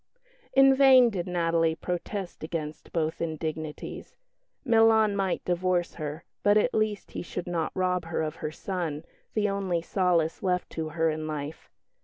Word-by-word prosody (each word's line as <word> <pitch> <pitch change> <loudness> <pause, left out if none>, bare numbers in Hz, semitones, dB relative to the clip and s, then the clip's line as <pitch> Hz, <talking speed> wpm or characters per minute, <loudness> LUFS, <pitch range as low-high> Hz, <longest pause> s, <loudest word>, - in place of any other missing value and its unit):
In 270 0 +7
vain 260 -3 +7
did 180 -4 -3
Natalie 165 -2 +1
protest 180 +1 -5
against 155 -1 -5
both 160 -1 -1
indignities. 155 -1 -5 0.5
Milan 225 -3 +5
might 195 -2 -1
divorce 175 0 0
her; 155 +1 -5 0.2
but 205 +1 +4
at 230 +4 +2
least 215 -2 -1
he - - -4
should 175 0 -5
not 170 -3 -2
rob 180 -2 0
her 165 -1 -2
of 155 0 -4
her 155 - -4
son, 165 -3 -4 0.3
the 210 -1 +2
only 190 -4 -1
solace 175 -4 +1
left 180 -2 -1
to 160 -1 -3
her 165 0 +3
in 155 0 -4
life. 150 0 -6
175 Hz, 155 wpm, -27 LUFS, 160-200 Hz, 0.5 s, In